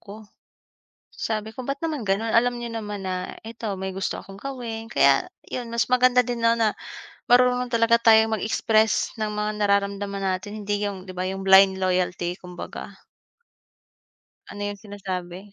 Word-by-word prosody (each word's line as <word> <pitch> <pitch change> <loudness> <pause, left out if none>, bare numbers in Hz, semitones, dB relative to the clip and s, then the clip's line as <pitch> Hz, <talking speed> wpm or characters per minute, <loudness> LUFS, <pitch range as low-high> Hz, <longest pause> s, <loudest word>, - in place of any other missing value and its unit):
ko. 210 +2 -11 0.9
Sabi 220 -1 -2
ko, 245 +3 -8
"Ba't 275 +2 -3
naman 300 -9 -3
ganon, 215 +4 0
alam 245 +2 +3
niyo 235 0 -5
naman 210 -3 -5
na 185 -1 -4
ito, 225 +1 -8
may 190 0 -4
gusto 190 0 -3
akong 195 0 -12
gawin." 230 -3 -6
Kaya 235 - +3 0.2
'yun, 245 -1 -4
mas 235 +1 0
maganda 250 0 +5
din 245 -1 -4
na 230 0 +5
na 225 -2 +2 0.6
marunong 250 0 +4
talaga 230 0 +3
tayong 220 -1 +5
mag-express 220 0 +1
ng 215 - 0
mga 210 0 -2
nararamdaman 200 0 0
natin, 195 +3 -3
hindi 205 0 -1
'yung 190 -2 -6
'di 185 - -8
ba 185 0 -3
'yung 195 0 -5
blind 190 0 +7
loyalty 180 -1 0
kumbaga 180 -1 -8 1.5
Ano 205 - -7
'yung 205 0 -5
sinasabi. 190 -2 -7
210 Hz, 160 wpm, -24 LUFS, 195-230 Hz, 1.5 s, blind